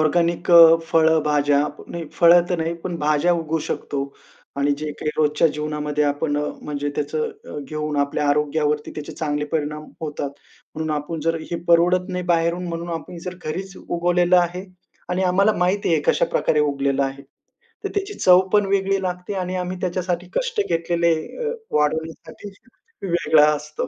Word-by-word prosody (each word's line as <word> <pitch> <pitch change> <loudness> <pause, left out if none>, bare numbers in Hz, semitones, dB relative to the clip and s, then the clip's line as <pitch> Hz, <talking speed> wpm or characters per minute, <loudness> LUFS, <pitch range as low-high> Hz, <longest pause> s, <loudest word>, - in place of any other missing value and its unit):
Organic 170 +3 +1
अ, 165 -1 +9
फळंभाज्या. 150 -3 +3 0.3
नाही, 170 -1 -5
फळं 170 0 +6
तर 175 - 0
नाही, 165 +1 -1
पण 175 -2 -3
भाज्या 150 +3 +2
उगवू 165 -1 -1
शकतो. 140 -1 -3 0.5
आणि 140 +1 +2
जे 155 0 -4
काही 150 - -3
रोजच्या 150 +1 +3
जीवनामध्ये 150 0 -2
आपण 145 +1 0
अ, 150 - 0 0.2
म्हणजे 145 -1 -3
त्याचं 150 0 -4
घेऊन 155 -1 -3
आपल्या 145 +1 0
आरोग्यावरती 150 0 0
त्याचे 150 -1 -7
चांगले 150 -1 -2
परिणाम 150 -1 -2 0.2
होतात. 145 -3 -4 0.4
म्हणून 160 0 -3
आपण 155 +2 -5
जर 165 +2 0 0.2
हे 170 - -1
परवडत 180 +2 +4
नाही 180 -1 -3
बाहेरून 170 +1 +1
म्हणून 170 +1 -5
आपण 170 - -11
जर 180 0 -5
घरीच 190 +5 -5
उगवलेलं 175 +1 +2
आहे 175 +1 -1 0.4
आणि 180 +1 -1
आम्हाला 195 +3 +3
माहिती 180 +1 +1
आहे 160 - +3
कशाप्रकारे 150 - +2
उगलेलं 140 -1 +1
आहे. 135 0 -4 0.6
तर - - 0
त्याची 405 0 -2
चव 180 - +6
पण 210 -1 +4
वेगळी 195 0 +1
लागते 180 +2 -4
आणि 185 -1 -3
आम्ही 180 0 -3
त्याच्यासाठी 180 0 -2
कष्ट 485 -3 -1
घेतलेले 170 0 +1 0.3
अ, 465 - -1 0.2
वाढवण्यासाठी 160 +6 -2 0.5
वेगळा 170 -4 +3
असतो. 150 +1 -5
165 Hz, 155 wpm, -22 LUFS, 150-180 Hz, 0.6 s, अ